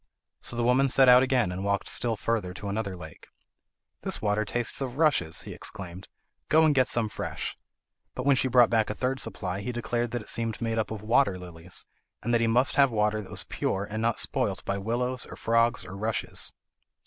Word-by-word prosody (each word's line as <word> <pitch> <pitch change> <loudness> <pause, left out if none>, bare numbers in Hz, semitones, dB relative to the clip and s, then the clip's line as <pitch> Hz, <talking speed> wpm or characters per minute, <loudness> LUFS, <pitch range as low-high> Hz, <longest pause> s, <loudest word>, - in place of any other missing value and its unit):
So - - 0
the 120 - -1
woman 125 +3 +3
set 130 +1 +5
out 125 0 +8
again 130 -7 +1
and 90 +2 -5
walked 100 0 -1
still 120 -2 0
further 105 -5 -2
to 100 - -6
another 100 -2 -3
lake. 90 - -12 0.7
"This - - -1
water 105 0 0
tastes 120 +5 0
of 130 -1 -4
rushes," 145 - +2
he - - -8
exclaimed, 95 0 -7 0.4
"go 160 +1 +5
and 155 - +4
get 130 -2 +3
some 115 -2 0
fresh." - - -5 0.6
But 125 - -4
when 140 -1 +5
she 130 - +2
brought 125 -2 +5
back 110 -2 +2
a 105 - -3
third 130 +3 -1
supply 95 -4 -3
he 125 - -3
declared 120 0 -2
that 120 -1 -4
it - - -2
seemed 115 -1 0
made 115 -1 -1
up 110 - -1
of 110 -2 -6
water 110 -3 +2
lilies, 90 -1 -6 0.4
and 120 - -1
that 115 - +3
he 115 - +2
must 125 +4 +3
have 140 -1 +6
water 105 -1 0
that 95 - -12
was - - 0
pure, 100 +1 -2
and 110 +1 -4
not 115 0 +1
spoilt 95 -5 0
by 100 0 -2
willows, 120 +4 -2
or - - -9
frogs, 115 +1 +1
or 95 - -8
rushes. 110 +2 -2
115 Hz, 215 wpm, -27 LUFS, 100-125 Hz, 0.7 s, out